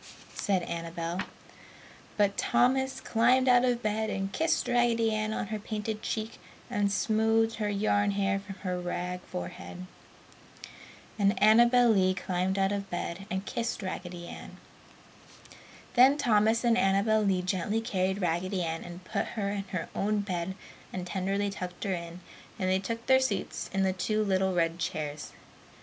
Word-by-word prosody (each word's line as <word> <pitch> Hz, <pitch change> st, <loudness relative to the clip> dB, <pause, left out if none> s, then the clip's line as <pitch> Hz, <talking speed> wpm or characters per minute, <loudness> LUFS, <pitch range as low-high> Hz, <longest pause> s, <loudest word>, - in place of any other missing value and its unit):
said 190 Hz, -4 st, 0 dB
Annabel. 170 Hz, +1 st, -4 dB, 1.0 s
But 200 Hz, -1 st, +3 dB
Thomas 265 Hz, +2 st, +2 dB
climbed 250 Hz, +3 st, +3 dB
out 245 Hz, -1 st, +6 dB
of 245 Hz, -1 st, +1 dB
bed 215 Hz, +1 st, 0 dB
and 195 Hz, -1 st, -3 dB
kissed 320 Hz, +6 st, +1 dB
Raggedy 235 Hz, -2 st, +2 dB
Ann 215 Hz, 0 st, -1 dB
on 210 Hz, -, -3 dB
her 215 Hz, -1 st, -3 dB
painted 215 Hz, 0 st, -4 dB
cheek 220 Hz, 0 st, -4 dB, 0.3 s
and 205 Hz, -4 st, +1 dB
smoothed 225 Hz, +2 st, +2 dB
her 210 Hz, -2 st, -1 dB
yarn 205 Hz, 0 st, +1 dB
hair 200 Hz, 0 st, +1 dB
from 195 Hz, -1 st, -9 dB
her 180 Hz, -1 st, -2 dB
rag 180 Hz, +1 st, -3 dB
forehead. 180 Hz, 0 st, -7 dB, 1.3 s
And 200 Hz, 0 st, +3 dB
Annabel 235 Hz, +3 st, +6 dB
Lee 185 Hz, -3 st, +3 dB
climbed 185 Hz, +1 st, -1 dB
out 195 Hz, 0 st, +2 dB
of 200 Hz, -1 st, -3 dB
bed, 175 Hz, -1 st, -3 dB
too, 195 Hz, -, -10 dB
and 190 Hz, 0 st, -3 dB
kissed 230 Hz, -3 st, -3 dB
Raggedy 175 Hz, -2 st, -5 dB
Ann. -, -, -10 dB, 1.4 s
Then 260 Hz, +3 st, +6 dB
Thomas 220 Hz, -3 st, +3 dB
and 235 Hz, 0 st, +3 dB
Annabel 200 Hz, +2 st, +3 dB
Lee 190 Hz, -3 st, +1 dB
gently 190 Hz, +4 st, 0 dB
carried 190 Hz, -3 st, -1 dB
Raggedy 180 Hz, +2 st, 0 dB
Ann 165 Hz, 0 st, -3 dB
and 175 Hz, +1 st, -9 dB
put -, -, -1 dB
her 200 Hz, -2 st, 0 dB
in 200 Hz, -1 st, -3 dB
her 185 Hz, -4 st, -4 dB
own 210 Hz, +1 st, 0 dB
bed 185 Hz, -2 st, -3 dB, 0.4 s
and 180 Hz, -1 st, -4 dB
tenderly 195 Hz, +2 st, -1 dB
tucked 180 Hz, -2 st, -6 dB
her 195 Hz, -, 0 dB
in, 170 Hz, 0 st, -6 dB, 0.4 s
and 185 Hz, -3 st, 0 dB
then 190 Hz, 0 st, +2 dB
took 230 Hz, +4 st, -4 dB
their 260 Hz, 0 st, +5 dB
seats 260 Hz, -7 st, -2 dB
in 195 Hz, 0 st, +1 dB
the 190 Hz, -1 st, +2 dB
two 215 Hz, +4 st, 0 dB
little 190 Hz, -2 st, +1 dB
red 165 Hz, 0 st, +1 dB
chairs. 150 Hz, -3 st, -4 dB
200 Hz, 160 wpm, -29 LUFS, 185-220 Hz, 1.4 s, out